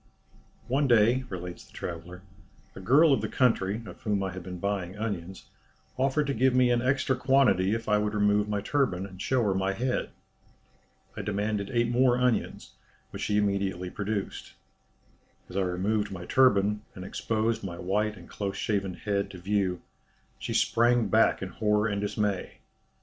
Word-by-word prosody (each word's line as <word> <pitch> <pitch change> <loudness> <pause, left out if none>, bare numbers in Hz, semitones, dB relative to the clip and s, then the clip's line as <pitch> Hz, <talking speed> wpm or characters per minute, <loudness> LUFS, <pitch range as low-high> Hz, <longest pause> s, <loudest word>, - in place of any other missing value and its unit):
"One 135 +3 +1
day," 120 +2 +4
relates 90 -2 -6
the - - -21
traveller, 90 +2 -7 0.5
"a - - -8
girl 140 - +5
of 125 - +1
the 110 - -2
country, 110 -3 +1
of - - -11
whom 105 -3 0
I 95 - -2
had 95 +1 -7
been 90 +1 -7
buying 100 0 -3
onions, 95 -4 -5 0.5
offered 135 +3 +1
to 140 - -1
give 130 +2 +2
me 125 -1 +4
an 120 -1 +2
extra 130 +1 +1
quantity 125 -7 +3
if 115 0 -5
I 105 -1 +3
would 105 0 -1
remove 105 0 +2
my 105 -1 -1
turban, 105 -7 0
and 95 -1 -10
show 130 -2 +1
her 100 -3 +2
my 95 +1 0
head. 125 +5 -1 1.1
I - - -4
demanded 105 0 -2
eight 120 -1 +1
more 125 0 +3
onions, 125 -2 -1 0.4
which - - -7
she 105 - 0
immediately 100 -3 -1
produced. 100 -1 -4 0.9
As 90 - -12
I 100 - +1
removed 100 +3 -1
my 90 -2 -7
turban, 105 -5 +3
and 95 -2 -7
exposed 110 +2 -1
my 85 -3 -5
white 105 +4 -1
and - - -13
close 100 -1 -4
shaven 100 -4 -1
head 100 -1 -2
to 95 - -10
view, 95 -1 -1 0.6
she - - -5
sprang 120 -2 +3
back 110 -2 +3
in 95 - -4
horror 105 +1 +1
and 100 -2 -2
dismay. 105 -2 -2
105 Hz, 170 wpm, -28 LUFS, 95-120 Hz, 1.1 s, girl